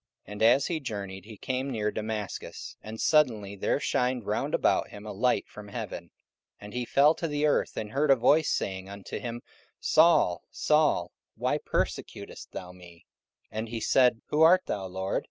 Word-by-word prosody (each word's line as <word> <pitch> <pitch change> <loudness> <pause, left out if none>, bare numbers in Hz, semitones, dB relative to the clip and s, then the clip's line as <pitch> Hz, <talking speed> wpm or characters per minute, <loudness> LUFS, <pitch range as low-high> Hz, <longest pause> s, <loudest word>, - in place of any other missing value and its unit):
44:009:003 - - -13
And 105 - -7
as 120 +5 +5
he 165 -2 -1
journeyed, 100 -7 -6
he 110 -1 -11
came 130 +4 -2
near 105 -4 -1
Damascus: 110 -2 -5
and 110 +1 -8
suddenly 110 -10 +2
there 100 - 0
shined 125 -2 0
round - - -1
about - - +2
him 105 +1 -11
a 105 - -5
light 125 +5 +1
from 105 -1 -11
heaven: 100 - -6
44:009:004 - - -28 0.5
And 105 0 -10
he 125 0 -2
fell 145 +5 +5
to 165 - -3
the 145 0 0
earth, 150 - +1
and 105 -1 -4
heard 145 +4 +1
a 135 - +8
voice 145 +6 +3
saying 95 0 -2
unto 100 -1 -7
him, 120 0 -6 0.4
Saul, 155 - +4
Saul, 150 - +2 0.2
why - - 0
persecutest - - -4
thou 90 -1 -7
me? 90 -2 -16 0.5
44:009:005 110 - -4
And 110 +1 -4
he 115 0 -4
said, 125 +1 +3
Who 150 - +1
art 180 +3 +7
thou, 95 -2 -3
Lord? 95 +1 -2
110 Hz, 190 wpm, -28 LUFS, 100-140 Hz, 0.5 s, a